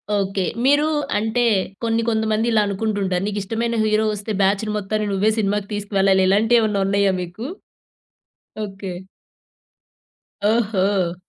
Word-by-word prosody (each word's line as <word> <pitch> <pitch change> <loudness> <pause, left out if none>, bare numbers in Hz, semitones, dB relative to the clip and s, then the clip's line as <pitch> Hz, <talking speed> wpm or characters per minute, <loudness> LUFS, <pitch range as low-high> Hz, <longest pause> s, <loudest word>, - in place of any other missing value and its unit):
Okay. 195 -1 -1 0.2
మీరు 290 +2 +4 0.3
అంటే 220 +3 0 0.4
కొన్ని, 230 0 +1
కొంతమంది 220 0 0
ఇలా 220 -1 +4
అనుకుంటుంటారు. 200 -2 -1
నీకు 210 0 -2
ఇష్టమైన 230 +3 -2
హీరో 215 0 +2
వస్తే 210 +1 -5
బ్యాచ్‌ని 200 +2 +1
మొత్తాన్ని 210 +1 -2
నువ్వే 205 +3 +2
సినిమాకి 205 -1 -1
తీసుకువెళ్ళాలి. 195 -2 +2
ఇలాంటివి 225 +4 +4
ఏమన్నా 210 -3 0
ఉన్నాయా 200 -1 +2
మీకు? 180 +6 -7 1.2
ఓకే. 195 -1 -7 1.6
ఓహో! 200 -5 +1
205 Hz, 115 wpm, -21 LUFS, 195-220 Hz, 1.6 s, మీరు